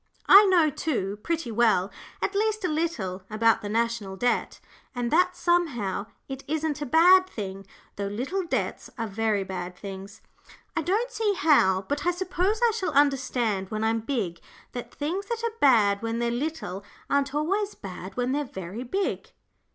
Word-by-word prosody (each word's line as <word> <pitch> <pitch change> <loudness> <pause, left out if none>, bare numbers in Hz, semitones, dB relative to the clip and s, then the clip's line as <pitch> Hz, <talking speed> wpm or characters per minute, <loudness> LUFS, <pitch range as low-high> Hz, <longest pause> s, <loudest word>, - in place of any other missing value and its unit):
I 405 +2 +9
know, 345 -6 +4
too, 210 -10 -2
pretty 330 -5 -2
well 215 -4 +2 0.3
at 395 - 0
least 430 0 0
a - - +3
little 300 - -2
about 225 +1 +3
the 205 - -5
National 225 -3 -1
Debt, 245 +5 0 0.4
and 245 -1 -2
that 360 +2 +3
somehow 255 - 0 0.2
it 270 0 -7
isn't 305 0 -2
a 290 - -2
bad 360 +6 +6
thing, 195 - -6 0.3
though 200 0 -2
little 265 - -2
debts 345 - -3
are 230 - -2
very 215 -1 0
bad 180 -1 -5
things. 195 +2 -9 0.5
I - - +1
don't 425 +10 0
see 430 -4 0
how, 195 - +4
but 290 0 -2
I 355 - +2
suppose 370 +4 -1
I - - +2
shall 380 -8 -2
understand 255 -8 +1
when 215 0 -3
I'm 225 +1 +1
big, 215 -8 -3 0.3
that 245 - -7
things 350 +8 -3
that 465 -1 -3
are 460 -1 -3
bad 210 -7 +4
when 230 0 -2
they're 235 0 0
little 245 - -3 0.2
aren't 280 0 0
always 390 +7 0
bad 190 0 -9
when 250 +1 0
they're 290 +2 0
very 190 -2 -7
big. 385 +11 -2
255 Hz, 170 wpm, -26 LUFS, 205-340 Hz, 0.5 s, I